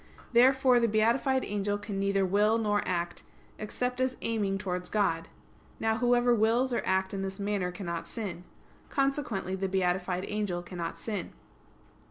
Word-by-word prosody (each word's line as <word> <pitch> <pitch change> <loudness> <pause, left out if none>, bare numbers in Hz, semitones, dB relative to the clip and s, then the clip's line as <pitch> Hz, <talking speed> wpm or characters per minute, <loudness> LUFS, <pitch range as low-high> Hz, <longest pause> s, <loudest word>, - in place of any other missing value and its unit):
Therefore 255 +1 +5
the 235 - +3
beatified 235 +5 +2
angel 205 0 -1
can 205 -1 -5
neither 195 0 +2
will 210 +4 +3
nor 205 -2 +1
act, 175 -1 -2 0.4
except 250 +4 -2
as 255 0 0
aiming 205 -4 0
towards 180 -2 -3
God. 165 -6 0 0.5
Now 220 0 +1
whoever 245 0 +3
wills 235 +3 +2
or - - +1
acts 190 +1 +1
in 195 - -2
this 195 +1 -4
manner 200 -3 -1
cannot 170 -2 -5
sin. 190 -7 -5 0.5
Consequently 270 - -1
the 190 0 -2
beatified 185 0 0
angel 205 -4 -2
cannot 170 -1 -5
sin. 215 -3 -4
205 Hz, 150 wpm, -29 LUFS, 190-230 Hz, 0.5 s, Therefore